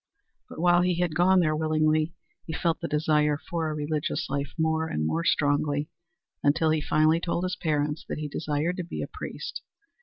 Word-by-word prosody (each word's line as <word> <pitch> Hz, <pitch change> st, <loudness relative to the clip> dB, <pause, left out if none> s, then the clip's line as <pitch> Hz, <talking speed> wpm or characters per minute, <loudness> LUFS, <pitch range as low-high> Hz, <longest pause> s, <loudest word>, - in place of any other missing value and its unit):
But -, -, -10 dB
while 175 Hz, +1 st, +5 dB
he 180 Hz, 0 st, +2 dB
had 175 Hz, -3 st, +1 dB
gone 180 Hz, +3 st, +4 dB
there 155 Hz, -2 st, +2 dB
willingly, 155 Hz, +1 st, +1 dB, 0.3 s
he 160 Hz, -, -4 dB
felt 165 Hz, 0 st, 0 dB
the -, -, -2 dB
desire 150 Hz, -1 st, +2 dB
for 160 Hz, 0 st, -3 dB
a 155 Hz, -, -3 dB
religious 150 Hz, 0 st, -2 dB
life 140 Hz, 0 st, -2 dB
more 160 Hz, 0 st, +1 dB
and 75 Hz, -, -2 dB
more 165 Hz, -, 0 dB
strongly, 145 Hz, -1 st, +1 dB, 0.5 s
until 155 Hz, +2 st, +3 dB
he 155 Hz, -1 st, +1 dB
finally 155 Hz, +2 st, +3 dB
told 170 Hz, +1 st, -2 dB
his 185 Hz, 0 st, -1 dB
parents 150 Hz, -1 st, -1 dB
that -, -, -3 dB
he 150 Hz, -1 st, -3 dB
desired 150 Hz, +4 st, -2 dB
to 180 Hz, -, -2 dB
be 170 Hz, -, -5 dB
a -, -, -4 dB
priest. -, -, -6 dB
155 Hz, 190 wpm, -27 LUFS, 150-170 Hz, 0.5 s, while